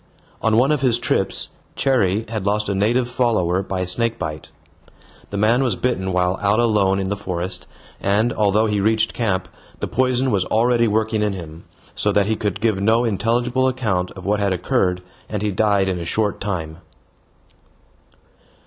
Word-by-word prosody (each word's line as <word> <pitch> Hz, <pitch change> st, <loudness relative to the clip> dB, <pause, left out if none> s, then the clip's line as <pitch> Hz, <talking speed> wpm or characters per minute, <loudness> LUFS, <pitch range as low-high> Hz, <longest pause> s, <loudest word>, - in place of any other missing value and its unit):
On 110 Hz, -1 st, +2 dB
one 130 Hz, +5 st, +4 dB
of 150 Hz, -3 st, +1 dB
his 125 Hz, -4 st, +3 dB
trips -, -, -1 dB, 0.3 s
Cherrie 110 Hz, -6 st, +1 dB
had 110 Hz, -2 st, -4 dB
lost 105 Hz, +2 st, 0 dB
a 100 Hz, -, 0 dB
native 115 Hz, +6 st, +1 dB
follower 110 Hz, -8 st, +1 dB
by 95 Hz, -1 st, -3 dB
snake 115 Hz, +6 st, -1 dB
bite. 80 Hz, 0 st, -5 dB, 0.8 s
The 100 Hz, -, -4 dB
man 110 Hz, +5 st, +3 dB
was 120 Hz, -7 st, +1 dB
bitten 95 Hz, -6 st, -1 dB
while 90 Hz, +1 st, +1 dB
out 105 Hz, +1 st, +2 dB
alone 105 Hz, -5 st, +3 dB
in 95 Hz, -1 st, -2 dB
the 100 Hz, -, -1 dB
forest, 90 Hz, -2 st, -4 dB, 0.3 s
and, 105 Hz, +5 st, +1 dB
although 105 Hz, +1 st, +2 dB
he 105 Hz, -2 st, 0 dB
reached 110 Hz, +2 st, +2 dB
camp, 100 Hz, -6 st, -1 dB, 0.3 s
the -, -, -2 dB
poison 130 Hz, 0 st, +1 dB
was 100 Hz, -4 st, +2 dB
already 120 Hz, +1 st, +2 dB
working 110 Hz, 0 st, 0 dB
in 105 Hz, -1 st, 0 dB
him, 85 Hz, -3 st, -9 dB, 0.3 s
so 105 Hz, -, 0 dB
that 100 Hz, -1 st, +3 dB
he 110 Hz, +2 st, 0 dB
could 105 Hz, -3 st, -3 dB
give 110 Hz, -4 st, +1 dB
no 110 Hz, +3 st, +3 dB
intelligible 120 Hz, +4 st, +1 dB
account 105 Hz, -9 st, -1 dB
of 95 Hz, -1 st, -10 dB
what 105 Hz, +1 st, +1 dB
had 100 Hz, -2 st, +1 dB
occurred, 90 Hz, -2 st, 0 dB, 0.3 s
and 105 Hz, -1 st, -3 dB
he 105 Hz, -, 0 dB
died 100 Hz, -1 st, +2 dB
in 90 Hz, -2 st, -1 dB
a -, -, -4 dB
short 105 Hz, +3 st, -1 dB
time. 80 Hz, -6 st, -3 dB
105 Hz, 175 wpm, -21 LUFS, 95-115 Hz, 0.8 s, one